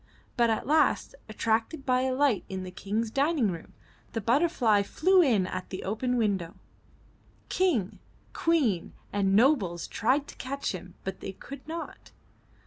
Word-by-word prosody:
But 235 -2 +3
at 220 - 0
last, 310 - +2 0.2
attracted 225 +7 -1
by 255 -2 +2
a 260 0 0
light 270 -7 +2
in 190 -1 -4
the 185 - -7
King's 210 +4 -2
dining 275 - +2
room, 165 -2 -9 0.4
the 225 - -1
butterfly 235 - +3
flew 370 - +3
in 225 - +3
at 185 0 -5
the 185 - -5
open 245 +5 -1
window. 195 -6 0 0.9
King, 295 - +1 0.3
Queen 265 - +1 0.2
and 195 -1 +2
nobles 210 - +3
tried 275 +6 +1
to - - -10
catch 275 +2 -3
him, 185 -1 -8
but 190 -1 -5
they 195 - -6
could 275 +8 -11
not. 330 +1 -7
230 Hz, 150 wpm, -28 LUFS, 195-280 Hz, 0.9 s, But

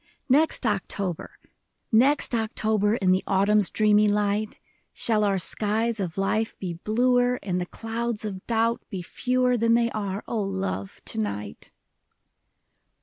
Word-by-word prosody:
Next 290 0 +3
October, 195 -4 -2 0.5
Next 260 +5 +3
October, 215 -2 +1
In 190 -5 +2
the 185 +1 +2
autumn's 200 +1 +3
dreamy 210 -1 +3
light. 205 +1 0 0.4
Shall 215 -2 +1
our 200 -2 +2
skies 220 +4 0
of 180 -3 -4
life 215 +3 -1
be 180 -3 -4
bluer, 245 +6 +1
And 180 -2 -1
the 180 - -4
clouds 225 0 -4
of 190 -3 -6
doubt 230 0 +1
be 190 -5 -5
fewer 250 +6 0
Than 230 0 +3
they 235 0 +2
are, 200 -1 -4
O 225 - -1
love, 190 - -4
to - - -1
night 105 -1 -5
210 Hz, 140 wpm, -25 LUFS, 195-230 Hz, 0.5 s, Next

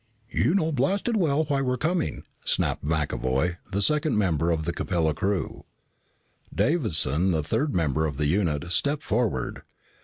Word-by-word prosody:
"You 170 - +2
know 160 -5 +2
blasted 190 - 0
well 160 -6 +2
why 145 -2 0
we 135 - -2
were 125 0 +1
coming," 165 +5 -1 0.2
snapped - - 0
McAvoy, 75 +1 0
the 100 +1 +1
second 150 +4 +2
member 85 -5 +1
of 80 -2 0
the 85 - -1
Capella 85 -4 0
crew. 95 -1 -2 0.9
Davison, 95 - +1
the 80 -4 +1
third 145 - -1
member 80 -2 +1
of 70 -3 -5
the 75 - 0
unit, 85 -1 0
stepped 140 - 0
forward. 110 - -1
95 Hz, 155 wpm, -26 LUFS, -, 0.9 s, You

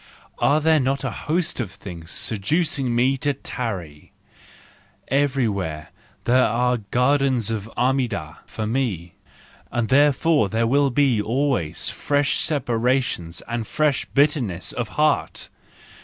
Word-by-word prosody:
Are 150 - +3
there 160 0 +3
not 135 +1 0
a 135 - -2
host 160 - -1
of 115 -6 -2
things 85 -4 -10
seducing 130 - -1
me 130 +3 +2
to 145 +1 -1
tarry! 95 - -6 1.0
Everywhere 110 - 0 0.3
there 125 +2 +4
are 125 +2 +1
gardens 125 -2 +2
of 110 -1 -4
Armida 120 - -1
for 110 - -4
me, 105 -8 -2 0.6
and 120 -2 -1
therefore 145 -3 +3
there 115 +2 +1
will 140 +3 +3 0.3
always 125 - -1
be - - -2
fresh 145 -1 +1
separations 125 - -1
and 115 -2 -3
fresh 150 -3 +1
bitterness 135 - 0
of 120 -3 -3
heart! 150 0 +1
125 Hz, 120 wpm, -23 LUFS, 110-140 Hz, 1.0 s, there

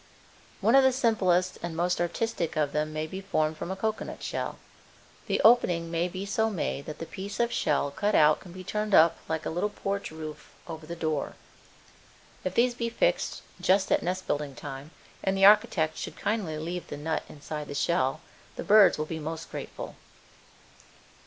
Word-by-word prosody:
One 220 +4 +3
of 270 0 +7
the 265 - +5
simplest 190 -8 +2
and 170 -1 -4
most 175 +1 +1
artistic 175 -1 -1
of 150 -2 +1
them 150 0 -1
may 155 0 -2
be 190 +5 -6
formed 155 -5 0
from 165 - -6
a 190 - -2
cocoanut 215 +2 -3
shell. - - -3 0.7
The - - +1
opening 175 -8 +4
may 170 +1 +1
be 185 +2 -5
so 220 +3 +1
made 160 -8 -3
that 155 - -6
the 165 - -6
piece 200 +3 -7
of 235 0 +2
shell 140 - +1
cut 205 +8 0
out 155 0 +5
can 180 - -13
be 185 +1 -9
turned 210 +2 0
up 165 +1 +6
like 160 -1 -2
a - - -2
little 175 +5 0
porch 200 -1 -3
roof 155 -1 -9
over 160 -2 -8
the 170 - -5
door. 155 -3 -2 1.1
If 185 - -3
these 245 +1 +4
be 235 -1 -2
fixed - - 0 0.2
just 190 +1 +3
at - - +4
nest 185 +2 -2
building 145 -2 -2
time 135 +4 -8 0.3
and 195 0 +1
the 195 - +6
architect 185 -6 +5
should - - -6
kindly 200 -7 -1
leave 170 +3 -4
the - - -6
nut 160 +2 -1
inside 150 0 -6
the 145 - -6
shell 135 -4 +1 0.3
the - - -5
birds 205 -3 +6
will 155 - -1
be 160 +1 -5
most 160 +1 -6
grateful. - - -7
175 Hz, 190 wpm, -28 LUFS, 155-205 Hz, 1.1 s, of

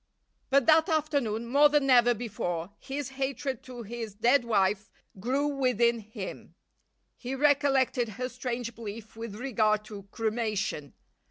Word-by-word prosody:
But 275 -2 +4
that 320 +2 +5
afternoon 285 -8 0
more 285 +5 +5
than 295 -2 +2
ever 240 -1 +6
before 190 -6 -4
his 275 0 -5
hatred 270 -1 -3
to 245 -2 -8
his 225 -1 -6
dead 240 +5 +3
wife 210 -2 +1 0.3
grew 260 +8 0
within 250 -5 +2
him. 215 0 -8 0.6
He 255 +1 -4
recollected 270 -4 +2
her 250 0 -2
strange 245 -2 -4
belief 220 0 -8
with 225 -2 -7
regard 215 -3 +1
to 205 -2 -10
cremation. 215 -9 -2
240 Hz, 135 wpm, -28 LUFS, 215-270 Hz, 0.6 s, ever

